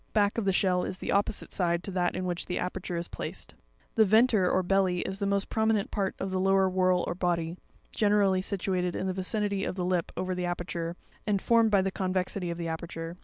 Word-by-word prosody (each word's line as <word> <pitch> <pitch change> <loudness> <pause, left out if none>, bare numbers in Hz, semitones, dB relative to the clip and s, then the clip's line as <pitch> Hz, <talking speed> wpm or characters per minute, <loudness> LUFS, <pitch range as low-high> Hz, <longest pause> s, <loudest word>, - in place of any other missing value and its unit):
Back 205 +1 +2
of 220 - -2
the 195 - +3
shell, 185 -1 +2
is 185 - -4
the - - -3
opposite 200 +1 0
side 170 -2 +1
to 195 - -4
that 180 -1 0
in 185 - -2
which 175 -1 -3
the 180 - -2
aper 180 +1 -2
ture 180 -1 -4
is 170 0 -3
placed. - - -7 0.4
The 225 - +5
venter 215 -2 +4
or 185 - +2
belly, 185 -1 +2
is 190 +1 -4
the 200 - 0
most 200 0 +1
prominent 220 -2 +1
part 195 -3 -1
of 190 0 -3
the 190 - 0
lower 195 0 +4
whorl 185 -1 +2
or - - -2
body, 170 -2 -1 0.4
generally 205 -3 +3
situated 185 -2 -1
in - - -2
the 190 - -1
vicinity 200 +1 -1
of - - -2
the 180 -2 -2
lip 180 -2 0
over 185 0 -1
the 180 0 -2
aperture, 175 -1 -3 0.3
and 205 -2 +2
formed 230 +2 +4
by 200 -3 +4
the 195 - -1
convexity 185 -1 -2
of 170 - -3
the 170 -1 -3
aperture. 165 +1 -5
185 Hz, 230 wpm, -29 LUFS, 180-200 Hz, 0.4 s, The